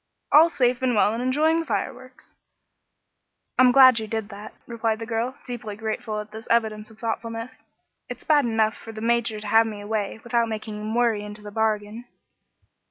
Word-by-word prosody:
"'All 320 +3 +7
safe 250 -5 +1
and 255 -2 +1
well 210 0 +3
and 230 - -3
enjoying 305 +6 +2
the 330 - -3
fireworks.'" 255 +1 -5 1.3
"I'm 255 -1 +7
glad 255 -2 +7
you 220 - -5
did 220 -1 -3
that," 210 +1 -10
replied 225 -2 -1
the 225 - -6
girl, 230 +3 -2
deeply 230 -4 -6
grateful 215 0 -4
at 210 0 -8
this 220 +1 -10
evidence 215 -2 0
of 220 - -17
thoughtfulness. 230 +1 -5 0.5
"It's - - -7
bad 295 -3 +3
enough 220 -2 +1
for 225 - -10
the 220 - -9
Major 230 -1 0
to 210 - -8
have 225 +2 +4
me 210 -2 -6
away, 205 0 -3
without 235 -1 0
making 215 -1 -5
him 215 +1 -4
worry, 230 -4 +1
into 210 0 -9
the 205 - -8
bargain." 220 +1 -2
225 Hz, 185 wpm, -24 LUFS, 215-240 Hz, 1.3 s, All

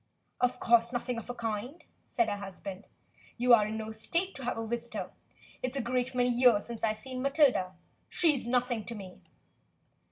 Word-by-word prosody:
"Of 250 0 +1
course 235 0 +4
nothing 245 -1 -2
of 230 - -10
the 245 - -5
kind," 235 +8 -4 0.2
said 235 -2 +1
her 205 -1 -1
husband. 195 0 -8 0.5
"You 245 0 +5
are 215 -3 +6
in 220 +1 -3
no 220 0 -5
state 340 - -1
to 270 - -8
have 245 - -1
a 225 - -3
visitor. 225 -4 -4 0.5
It's 255 +2 -2
a - - +1
great 250 +1 -1
many 250 0 +3
years 240 -4 +4
since 235 -1 -7
I've 215 -1 +1
seen 255 +2 -6
Matilda. 270 - +3 0.3
She's 300 -8 +2
nothing 245 -2 +1
to 235 - -6
me." 190 -3 -10
235 Hz, 185 wpm, -30 LUFS, 220-255 Hz, 0.5 s, are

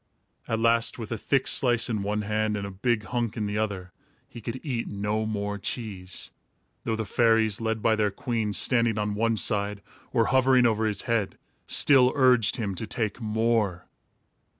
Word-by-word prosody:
At 115 - -1
last, 115 0 +2
with 115 -3 -7
a 115 - -2
thick 135 +2 0
slice 120 -3 +4
in 110 -4 -2
one 105 +1 -2
hand 105 0 -1
and 100 - -4
a 100 - -6
big 110 +3 -1
hunk 120 -2 -3
in 105 - -2
the 105 +1 -2
other, 100 -4 -3 0.4
he 120 -4 -11
could 115 +4 -5
eat 125 -5 -3
no 105 +2 -2
more 105 -1 -3
cheese; 95 -5 -5 0.5
though 115 - 0
the 110 0 -3
fairies, 115 0 +2
led 110 -1 -2
by 110 -1 +3
their 105 -1 +1
queen, 110 0 -3
standing 115 -1 +1
on 105 0 -1
one 115 +2 0
side, 100 -2 0 0.3
or 115 -3 +2
hovering 130 -1 +4
over 110 -1 +1
his 105 -2 -2
head, 115 -5 -1 0.3
still 130 -3 +5
urged 125 -5 +4
him 105 -5 -3
to 105 +4 -5
take 110 0 -3
more. 110 -4 0
110 Hz, 180 wpm, -26 LUFS, 105-115 Hz, 0.5 s, still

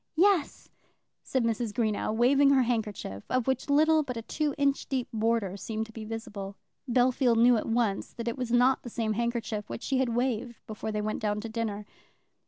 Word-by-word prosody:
"Yes," 360 -2 +2 0.5
said 260 -2 -1
Mrs. 230 -1 -1
Greenow, 220 -3 0
waving 265 +5 +4
her 270 -2 +5
handkerchief, 210 - -3
of 255 -2 +1
which 265 +1 -1
little 310 +2 +4
but 250 -5 -5
a 230 - -5
two 300 +3 -2
inch 280 -1 +1
deep 260 -3 -1
border 220 -3 0
seemed 220 +2 -4
to 220 - -14
be 220 -1 -8
visible. 205 -3 -6 0.4
Bellfield 245 -1 +3
knew 240 +1 +6
at 220 - -2
once 225 -4 0
that 235 0 -6
it 235 - -1
was 250 -3 -4
not 250 +2 +4
the 240 - -8
same 220 -1 -1
handkerchief 235 -2 -2
which - - -6
she 265 -1 0
had 260 -2 +1
waved 240 0 -2
before 215 0 -5
they 210 0 -2
went 215 0 -2
down 210 -1 0
to 230 - -6
dinner. 220 -2 -3
235 Hz, 195 wpm, -28 LUFS, 220-255 Hz, 0.5 s, knew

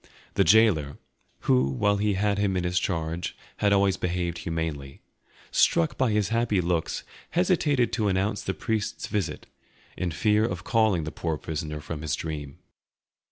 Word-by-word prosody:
The - - +3
gaoler, 85 -7 +4 0.4
who 65 0 +3
while 100 +10 +1
he 105 0 +1
had 95 - -1
had 100 -1 +2
him 100 -2 +1
in 90 - -1
his 90 0 +1
charge 85 -1 -3 0.2
had 100 - +2
always 100 -1 +3
behaved 85 -1 -2
humanely, 80 -4 -4 0.5
struck 85 - +3
by 130 -2 +2
his 105 -2 +1
happy 115 -3 +1
looks, 85 -2 -1 0.3
hesitated 160 -8 +2
to 110 -3 +1
announce 100 +2 0
the 95 - -3
priest's 110 -2 -2
visit, 105 -2 -3 0.5
in 90 - -2
fear 105 +6 +2
of 90 -4 -2
calling 110 -7 +2
the 75 - -4
poor 80 -2 -2
prisoner 75 0 -4
from 75 +1 -6
his 80 -3 -1
dream. 75 -4 -6
90 Hz, 160 wpm, -26 LUFS, 80-105 Hz, 0.5 s, gaoler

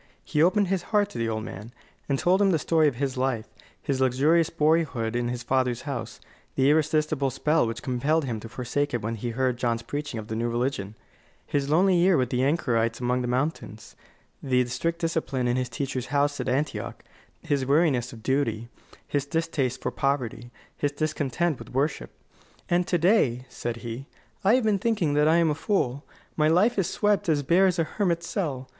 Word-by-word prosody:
He 150 - 0
opened 185 +3 +3
his 190 -2 0
heart 205 -2 +2
to - - -6
the 115 0 0
old 110 -1 -2
man, 110 +1 -8 0.4
and 140 - +2
told 185 +7 +2
him 200 - +4
the 170 - +3
story 160 0 +2
of 140 - 0
his 135 0 -2
life: 125 -4 0 0.3
his 135 -3 -2
luxurious 145 +6 +3
boyhood 150 -8 +1
in 120 0 0
his 125 0 -4
father's 130 -2 0
house; 140 -3 -5 0.4
the 135 +2 +4
irresistible 155 -2 +1
spell 150 +1 +1
which 115 +3 -5
compelled 140 +4 0
him 115 -4 -3
to 115 - -9
forsake 125 +4 -2
it 120 - -3
when 115 +2 -2
he 115 +2 -4
heard 125 +1 0
John's 115 -2 -1
preaching 145 -1 -4
of 105 - -8
the 110 - -4
new 115 +1 -1
religion; 120 -4 -2 0.5
his 140 -1 -1
lonely 180 +5 +4
year 175 +1 +4
with 125 -2 0
the 125 0 +1
anchorites 120 -6 +1
among 125 0 0
the 125 - -2
mountains; 125 -4 -3 0.5
the 125 -2 +2
strict 165 +7 -2
discipline 160 -7 -1
in 120 - +1
his 130 -1 -1
teacher's 130 0 -3
house 145 +1 +1
at - - -2
Antioch; 140 +4 -2 0.4
his 140 -2 0
weariness 140 -5 +2
of 115 -2 -12
duty, 120 -4 0 0.4
his 145 -1 -1
distaste 140 -5 -1
for - - -1
poverty, 125 -4 -2 0.3
his 145 - -1
discontent 155 0 -1
with - - -11
worship. 145 +4 -1 0.6
"And 175 +1 +2
to 175 - +2
day," 160 - +2
said 120 -2 -4
he, 120 +4 -6 0.4
"I 205 +5 +5
have 255 - +2
been 210 -2 +2
thinking 190 -9 +1
that 150 +1 +3
I 160 - +5
am 165 -2 +3
a - - +1
fool. 145 - -1 0.3
My 155 -1 +3
life 195 +8 +3
is 190 -1 +1
swept 205 -5 +1
as 145 -2 +2
bare 180 +7 +4
as 180 -1 0
a 165 - +2
hermit's 170 -1 -1
cell. 140 -10 -3
140 Hz, 200 wpm, -26 LUFS, 125-165 Hz, 0.6 s, I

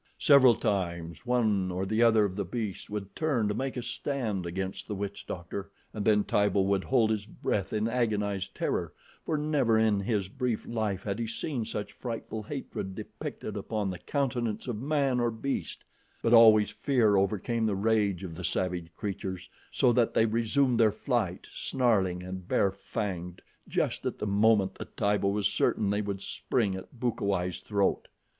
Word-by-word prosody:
Several 130 -5 +7
times 85 -2 -2
one 110 -6 +2
or 90 +1 -2
the 110 +4 0
other 115 -3 +5
of 95 -2 -3
the 100 - -1
beasts 105 +1 -4
would 105 -2 -5
turn 140 -9 +1
to 105 - 0
make 130 +3 -3
a 125 - -3
stand 120 -7 -2
against 95 +2 -4
the 105 - -3
witch 100 0 -5
doctor, 95 +3 -5 0.2
and 105 - -3
then 105 -1 +4
Tibo 100 -1 +2
would 95 0 +1
hold 120 -4 +3
his 105 -1 -2
breath 100 -3 -2
in 110 +1 0
agonized 105 -5 -1
terror, - - -1 0.3
for 155 - +1
never 145 -7 +2
in 110 -2 +3
his 100 -1 -1
brief 125 +1 -2
life 110 -5 -2
had 100 +1 -3
he 115 - -1
seen 120 +1 -3
such 105 -1 -4
frightful 115 -2 -5
hatred 105 -6 -5
depicted 110 - -6
upon 105 -1 -2
the 90 - -7
countenance 120 - -2
of 115 -3 -3
man 140 -3 +1
or 120 0 +2
beast; 115 +5 -4 0.4
but 115 - +3
always 110 -2 +7
fear 120 -7 +2
overcame 105 +4 +1
the 105 - 0
rage 100 -3 +1
of 90 -3 -6
the 90 +3 -7
savage 90 -2 -1
creatures, 95 -3 -4 0.2
so 125 -3 +3
that 120 -1 +2
they 110 - +5
resumed 115 +3 +2
their 110 -2 +5
flight, 110 -5 -1
snarling 100 -9 +1
and 95 0 -7
bare 100 - +2
fanged, 90 -2 -4 0.3
just - - -1
at - - -3
the - - -3
moment 100 -1 +3
that - - -10
Tibo 100 -1 +2
was 100 0 +2
certain 100 0 +1
they 105 +1 +1
would 100 -1 -4
spring 105 -6 -1
at 95 +6 -10
Bukawai's 100 -7 -1
throat. 100 -2 0
105 Hz, 175 wpm, -29 LUFS, 95-115 Hz, 0.4 s, Several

